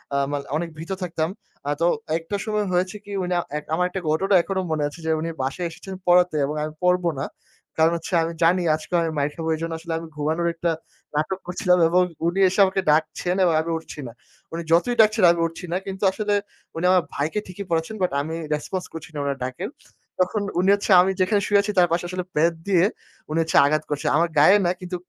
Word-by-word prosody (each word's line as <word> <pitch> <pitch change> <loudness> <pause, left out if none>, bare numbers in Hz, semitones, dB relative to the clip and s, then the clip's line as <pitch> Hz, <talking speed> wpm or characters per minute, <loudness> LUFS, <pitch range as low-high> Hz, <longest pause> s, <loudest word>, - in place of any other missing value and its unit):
আ - - +2
মানে 140 -1 -3
অনেক 170 +1 -3
ভীত 165 +4 -7
থাকতাম। 165 -2 -2 0.4
আ - - 0
তো - - +4 0.3
একটা 165 +5 -5
সময় 210 -1 0
হয়েছে 180 +2 0
কি 205 - -10
উনি 180 0 -1
আ - - +1 0.2
এক 150 - -5
আমার 180 +2 +2
একটা 190 +1 -4
ঘটনা 190 +6 +1
এখনো 190 +2 -2
মনে 155 -1 0
আছে 145 +4 -10
যে, - - -1
উনি 165 +1 -3
বাসায় 140 +7 -2
এসেছেন 190 +3 -9
পড়াতে 180 -2 +5
এবং 150 +2 -3
আমি 155 - -4
পড়বো 180 -1 +3
না। - - -1 0.5
কারণ 160 +1 +4
হচ্ছে 170 +2 -8
আমি 165 - -2
জানি 180 +3 +4
আজকে 155 +3 -10
আমি 165 - 0
মাইর 145 +1 0
খাব 165 - -5
এজন্য 165 +1 -4
আসলে 165 0 -5
আমি 165 - -8
ঘুমানোর 160 +3 -1
একটা 170 0 -1 0.4
নাটক 155 +6 -1
করছিলাম 180 0 +2
এবং 180 +2 +4 0.3
উনি 175 +3 0
এসে 190 - -3
আমাকে 190 0 0
ডাকছেন 160 +4 0
এবং 175 -2 +3
আমি 165 +1 -4
উঠছি 160 -2 -10
না। - - -8 0.4
উনি 165 - -3
যতই 180 +9 +3
ডাকছেন, 215 -1 +3
আমি 170 - -2
উঠছি 165 +3 -9
না 180 - +1
কিন্তু 195 +1 -6
আসলে 210 +1 -1 0.4
উনি 165 +2 -2
আমার 185 -2 +4
ভাইকে 155 +8 -1
ঠিকই 185 +2 -7
পড়াচ্ছেন 165 +5 -1
বাট 180 - +1
আমি 160 +3 -4 0.2
রেসপন্স 180 +5 -3
করছি 165 -1 -8
না - - -7
উনার 140 -1 -2
ডাকের। 130 - -4 0.5
তখন 185 +3 +1 0.2
উনি 185 +2 +3
হচ্ছে 200 +1 -3
আমি 190 +2 +2
যেখানে 200 +2 +2
শুয়ে 205 -1 +4
আছি 205 +1 -2
তার 175 - +6
পাশে 175 +1 0
আসলে 180 0 -3
বেত 165 +3 +3
দিয়ে 185 -3 +4 0.4
উনি 155 +2 0
হচ্ছে 160 - +1
আঘাত 155 +1 +1
করছে, 145 -1 -3
আমার 170 +2 +3
গায়ে 185 +8 +7
না 175 - +3
কিন্তু 180 0 -5
170 Hz, 220 wpm, -23 LUFS, 160-185 Hz, 0.5 s, গায়ে